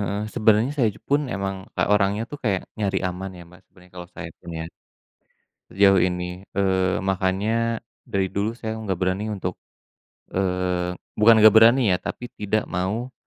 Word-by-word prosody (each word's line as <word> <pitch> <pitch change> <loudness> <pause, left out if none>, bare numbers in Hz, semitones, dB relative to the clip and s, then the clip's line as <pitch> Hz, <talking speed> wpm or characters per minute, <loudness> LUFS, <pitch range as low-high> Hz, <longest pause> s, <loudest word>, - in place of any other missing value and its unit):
heeh. 100 +1 -2
Sebenarnya 110 +3 +3
saya 130 -7 +2
j - - -16
pun 145 +1 +2
emang, 95 -3 -4
e - - +2
orangnya 105 +1 +2
tuh 145 - -7
kayak 95 -4 +1 0.2
nyari 95 -2 0
aman 95 +2 -5
ya, 85 - -10
Mbak, 90 - -17
sebenarnya 90 -2 -21
kalau 90 0 -8
saya - - -6
pun 85 - -14
ya. 80 - -4 1.1
Sejauh 95 0 +5
ini. 90 +1 -2
Eee, 95 -1 +1
makanya 100 +5 0 0.3
dari 95 -1 0
dulu 100 +3 -1
saya 110 -2 -5
nggak 95 -5 -3
berani 95 +3 0
untuk, 95 - -4 0.8
eee, 90 -1 -1 0.2
bukan 115 +2 +8
nggak 110 -1 +8
berani 115 +4 +7
ya, - - +2
tapi 125 - -5
tidak 105 +1 0
mau 105 +8 -3
100 Hz, 165 wpm, -23 LUFS, 95-110 Hz, 1.1 s, bukan